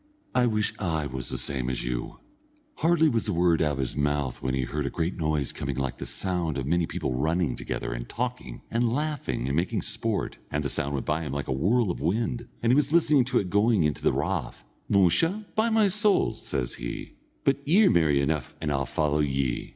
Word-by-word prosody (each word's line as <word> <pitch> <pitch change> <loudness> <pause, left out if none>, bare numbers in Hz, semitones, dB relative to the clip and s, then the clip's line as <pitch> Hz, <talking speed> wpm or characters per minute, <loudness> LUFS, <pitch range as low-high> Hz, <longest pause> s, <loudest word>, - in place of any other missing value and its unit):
I 125 -1 +3
wish 105 -2 0
I 80 -6 -1
was 65 -3 -4
the - - -3
same 65 -2 -2
as 65 -2 -3
you." - - -3 0.6
Hardly 165 -1 +4
was 115 -5 +1
the 105 - 0
word 85 -1 +3
out 75 -2 +2
of - - -4
his 65 -3 -2
mouth 70 -2 -1
when 65 0 -1
he 65 - 0
heard 75 +2 -2
a - - 0
great 85 +2 -2
noise 75 -4 0
coming 70 -1 -3
like 65 -1 -3
the - - -5
sound 90 -6 -1
of 65 - -2
many 85 +2 +1
people 80 -7 -2
running 80 +1 0
together, - - -4
and - - -6
talking, 125 +1 -4
and 115 0 +1
laughing, 150 - -2
and 70 - 0
making 85 +3 0
sport, - - -1
and 75 +1 -1
the 70 - -1
sound 70 +1 -2
went 70 - -3
by 75 +2 0
him 75 -5 -4
like 70 0 -3
a - - -2
whirl 100 - +2
of - - -6
wind, 115 - -1 0.2
and 115 - +4
he - - +5
was 150 0 +2
listening 155 -6 +4
to 125 -1 +1
it 90 -5 0
going 105 -2 +3
into 75 -1 0
the - - +3
rath. 70 -1 -2 0.3
"Musha, 130 - +3
by 220 +2 +2
my 220 -2 +4
soul," 210 +1 +2
says 60 -2 -3
he, - - -5 0.3
"but 135 0 +3
ye're 190 +9 +5
merry 75 -4 +3
enough, 70 -2 -1
and 75 -2 -2
I'll 70 -2 0
follow 75 +1 0
ye." 70 -4 0
80 Hz, 220 wpm, -27 LUFS, -, 0.6 s, he